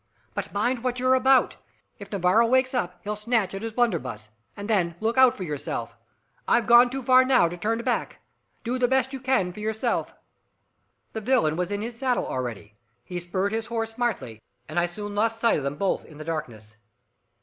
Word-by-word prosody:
But -, -, -4 dB
mind 240 Hz, +4 st, -1 dB
what 250 Hz, -1 st, -1 dB
you're 255 Hz, +1 st, +3 dB
about! 260 Hz, 0 st, +4 dB, 0.4 s
If 200 Hz, -, -10 dB
Navarro 200 Hz, +4 st, +3 dB
wakes 260 Hz, +2 st, +2 dB
up, 180 Hz, -8 st, -2 dB
he'll 210 Hz, +1 st, -3 dB
snatch 210 Hz, -2 st, 0 dB
at 195 Hz, -, -5 dB
his 225 Hz, -1 st, -5 dB
blunderbuss, 130 Hz, -, -1 dB, 0.3 s
and 205 Hz, 0 st, -6 dB
then 180 Hz, -7 st, +1 dB
look 225 Hz, +2 st, 0 dB
out 260 Hz, -1 st, +5 dB
for 190 Hz, -, -5 dB
yourself! 150 Hz, -5 st, -4 dB, 0.5 s
I've 235 Hz, -, +3 dB
gone 240 Hz, +1 st, +7 dB
too 265 Hz, +1 st, -5 dB
far 255 Hz, +1 st, +6 dB
now 255 Hz, -9 st, +4 dB
to 170 Hz, -, -5 dB
turn 215 Hz, +6 st, -1 dB
back. -, -, -1 dB, 0.5 s
Do 250 Hz, +2 st, -2 dB
the 245 Hz, -, +3 dB
best 265 Hz, +1 st, +1 dB
you 270 Hz, -, -4 dB
can 255 Hz, -8 st, +1 dB
for 185 Hz, -, -11 dB
yourself!" 220 Hz, +1 st, -2 dB, 1.0 s
The 220 Hz, -, -4 dB
villain 225 Hz, -10 st, +2 dB
was 180 Hz, +2 st, -2 dB
in 205 Hz, +1 st, -3 dB
his 235 Hz, 0 st, -6 dB
saddle 255 Hz, -2 st, 0 dB
already, 115 Hz, -5 st, -5 dB, 0.3 s
he 180 Hz, -1 st, -5 dB
spurred 185 Hz, +3 st, -2 dB
his 225 Hz, 0 st, -2 dB
horse 225 Hz, -1 st, -2 dB
smartly, 225 Hz, -, -3 dB, 0.3 s
and -, -, -1 dB
I 175 Hz, -, +2 dB
soon 205 Hz, +4 st, -7 dB
lost 225 Hz, +2 st, 0 dB
sight 230 Hz, 0 st, +3 dB
of -, -, -6 dB
them 140 Hz, +1 st, -2 dB
both 195 Hz, +5 st, -1 dB
in 150 Hz, -, -15 dB
the 155 Hz, -, -8 dB
darkness. 115 Hz, -9 st, -6 dB
220 Hz, 200 wpm, -25 LUFS, 175-245 Hz, 1.0 s, gone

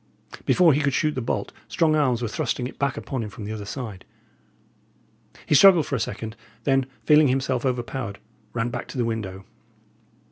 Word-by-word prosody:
Before 175 Hz, -4 st, +5 dB
he 145 Hz, -, +1 dB
could 140 Hz, -2 st, +1 dB
shoot 155 Hz, -2 st, +1 dB
the 130 Hz, -, -3 dB
bolt, 115 Hz, -, -2 dB, 0.2 s
strong 155 Hz, -2 st, +2 dB
arms 130 Hz, -6 st, +1 dB
were -, -, 0 dB
thrusting 120 Hz, 0 st, -2 dB
it 125 Hz, -, -8 dB
back 140 Hz, -1 st, 0 dB
upon 130 Hz, -3 st, -4 dB
him 110 Hz, -, -4 dB
from 105 Hz, -, -9 dB
the 105 Hz, -, -5 dB
other 105 Hz, -2 st, -5 dB
side. 105 Hz, -4 st, -6 dB, 1.4 s
He -, -, +1 dB
struggled 175 Hz, +1 st, +7 dB
for -, -, -2 dB
a -, -, -1 dB
second; 110 Hz, 0 st, -4 dB, 0.3 s
then, 135 Hz, 0 st, +2 dB, 0.2 s
feeling 150 Hz, -1 st, +6 dB
himself 130 Hz, -1 st, 0 dB
overpowered, 120 Hz, -4 st, -3 dB, 0.3 s
ran 115 Hz, 0 st, -1 dB
back 120 Hz, +1 st, -5 dB
to -, -, -8 dB
the 120 Hz, -, +1 dB
window. 100 Hz, -4 st, -4 dB
125 Hz, 185 wpm, -24 LUFS, 115-140 Hz, 1.4 s, struggled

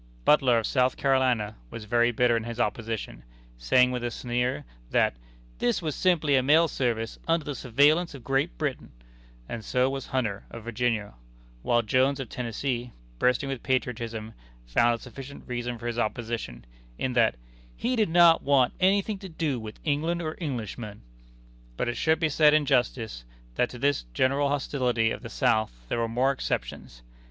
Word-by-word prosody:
Butler, 130 Hz, -5 st, +5 dB
of 115 Hz, -, 0 dB
South 130 Hz, -2 st, +1 dB
Carolina, 130 Hz, -6 st, +1 dB
was 110 Hz, -, -8 dB
very 120 Hz, +2 st, +3 dB
bitter 120 Hz, 0 st, +3 dB
in 115 Hz, -, -1 dB
his 120 Hz, 0 st, -6 dB
opposition 115 Hz, 0 st, -3 dB, 0.4 s
saying, 125 Hz, -, +4 dB
with 125 Hz, -1 st, -3 dB
a 120 Hz, -, 0 dB
sneer, 120 Hz, -, -2 dB, 0.2 s
that -, -, +2 dB, 0.5 s
"this 120 Hz, -, +1 dB
was 155 Hz, -4 st, -3 dB
simply 160 Hz, -5 st, +2 dB
a 130 Hz, -, +4 dB
mail 155 Hz, +5 st, +5 dB
service 115 Hz, -6 st, -2 dB
under 165 Hz, -1 st, +1 dB
the 145 Hz, -, -3 dB
surveillance 145 Hz, +7 st, +2 dB
of 130 Hz, -, -11 dB
Great 135 Hz, -, 0 dB
Britain" -, -, -3 dB, 0.5 s
and 115 Hz, -, -6 dB
so 130 Hz, +3 st, +1 dB
was 135 Hz, -1 st, -5 dB
Hunter, 110 Hz, -7 st, -2 dB
of 115 Hz, -, -9 dB
Virginia; 115 Hz, -2 st, -1 dB, 0.5 s
while 120 Hz, -, +2 dB
Jones, 130 Hz, +5 st, +2 dB
of 130 Hz, -5 st, -5 dB
Tennessee, 120 Hz, 0 st, -3 dB, 0.3 s
bursting 125 Hz, +2 st, +2 dB
with 135 Hz, -3 st, -4 dB
patriotism, 115 Hz, -4 st, -2 dB, 0.3 s
found 115 Hz, -, +3 dB
a -, -, -15 dB
sufficient 135 Hz, +2 st, -10 dB
reason 120 Hz, -1 st, -4 dB
for 115 Hz, -, -10 dB
his 120 Hz, 0 st, -2 dB
opposition, 110 Hz, -, -3 dB, 0.3 s
in 130 Hz, -, -2 dB
that 115 Hz, -, +3 dB, 0.4 s
"he 250 Hz, +2 st, -1 dB
did 215 Hz, -6 st, +2 dB
not 170 Hz, 0 st, +6 dB
want 135 Hz, -3 st, +3 dB
anything 195 Hz, +2 st, +2 dB
to 190 Hz, -1 st, -9 dB
do 155 Hz, -6 st, -2 dB
with 110 Hz, -1 st, -9 dB
England 160 Hz, +3 st, 0 dB
or 155 Hz, -2 st, -4 dB
Englishmen!" 115 Hz, -, -5 dB, 0.7 s
But -, -, -1 dB
it 120 Hz, -, -1 dB
should 160 Hz, +6 st, +2 dB
be 160 Hz, -, +2 dB
said 150 Hz, 0 st, +5 dB
in 155 Hz, -1 st, +3 dB
justice, 120 Hz, -, 0 dB, 0.3 s
that 125 Hz, -, +1 dB
to 125 Hz, -, -9 dB
this 140 Hz, -, 0 dB
general 140 Hz, -, +2 dB
hostility 125 Hz, -5 st, 0 dB
of -, -, -5 dB
the -, -, -8 dB
South -, -, 0 dB
there -, -, -1 dB
were 115 Hz, -, 0 dB
some 125 Hz, +3 st, +2 dB
exceptions. -, -, -4 dB
125 Hz, 175 wpm, -27 LUFS, 115-140 Hz, 0.7 s, not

